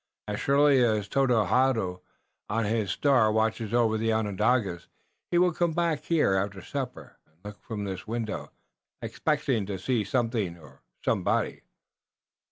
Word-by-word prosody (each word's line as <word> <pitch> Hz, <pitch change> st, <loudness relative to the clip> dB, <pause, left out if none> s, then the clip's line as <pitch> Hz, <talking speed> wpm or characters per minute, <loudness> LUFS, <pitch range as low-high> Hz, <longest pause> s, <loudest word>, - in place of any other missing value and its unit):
"As -, -, -3 dB
surely 140 Hz, -1 st, +4 dB
as 110 Hz, -3 st, +1 dB
Tododaho 125 Hz, -6 st, +2 dB, 0.5 s
on 115 Hz, +1 st, 0 dB
his 110 Hz, -1 st, 0 dB
star 130 Hz, -7 st, +3 dB
watches 110 Hz, 0 st, 0 dB
over 115 Hz, -2 st, +2 dB
the 115 Hz, 0 st, +1 dB
Onondagas, 105 Hz, -3 st, 0 dB, 0.4 s
he 175 Hz, -, +1 dB
will 180 Hz, 0 st, +4 dB
come 170 Hz, -1 st, 0 dB
back 165 Hz, -2 st, 0 dB
here 160 Hz, -, +2 dB
after 95 Hz, +1 st, -1 dB
supper 135 Hz, -3 st, -6 dB
and 80 Hz, -, -34 dB
look 105 Hz, 0 st, -9 dB
from 110 Hz, -3 st, -5 dB
this 95 Hz, -1 st, -5 dB
window, 115 Hz, -1 st, -4 dB, 0.5 s
expecting 115 Hz, -8 st, -1 dB
to 100 Hz, -2 st, -3 dB
see 120 Hz, +1 st, 0 dB
something 110 Hz, -5 st, -1 dB
or 75 Hz, -6 st, -17 dB, 0.2 s
somebody." -, -, 0 dB
110 Hz, 140 wpm, -27 LUFS, 100-130 Hz, 0.5 s, surely